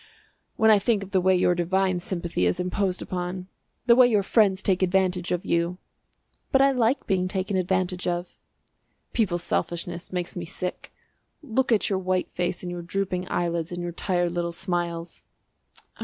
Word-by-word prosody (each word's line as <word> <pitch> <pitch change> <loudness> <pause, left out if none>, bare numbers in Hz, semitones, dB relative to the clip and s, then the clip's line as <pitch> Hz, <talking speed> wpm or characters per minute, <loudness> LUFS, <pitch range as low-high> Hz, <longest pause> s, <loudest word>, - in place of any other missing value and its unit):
"When 220 -1 +5
I 210 - +6
think 205 -1 +1
of 195 - -11
the 190 -1 +3
way 190 +1 +4
your 180 0 +3
divine 185 +1 +1
sympathy 170 - -1
is 90 - 0
imposed 180 +1 -1
upon 180 +1 -4 0.4
the 235 -1 +6
way 250 0 +7
your 210 -4 +2
friends 195 -2 +3
take 190 -1 +2
advantage 185 -1 +1
of 180 0 -1
you!" 170 +1 0 0.7
"But 265 - +4
I 275 0 +5
like 250 +1 +1
being 185 -1 +1
taken 190 +1 -2
advantage 185 0 0
of." 175 0 -1 0.9
"People's 180 -7 0
selfishness 170 0 -3
makes 180 -1 -3
me 175 - -4
sick. 180 +2 -6 0.5
Look 260 -1 0
at 220 - +3
your 195 -2 0
white 185 -1 -1
face 175 0 -2
and 175 - -4
your 175 0 -5
drooping 180 0 -2
eyelids, 170 -1 -1
and 175 - -4
your 175 - -3
tired 175 0 0
little 170 0 -2
smiles." 170 -2 -3
180 Hz, 170 wpm, -25 LUFS, 175-195 Hz, 0.9 s, way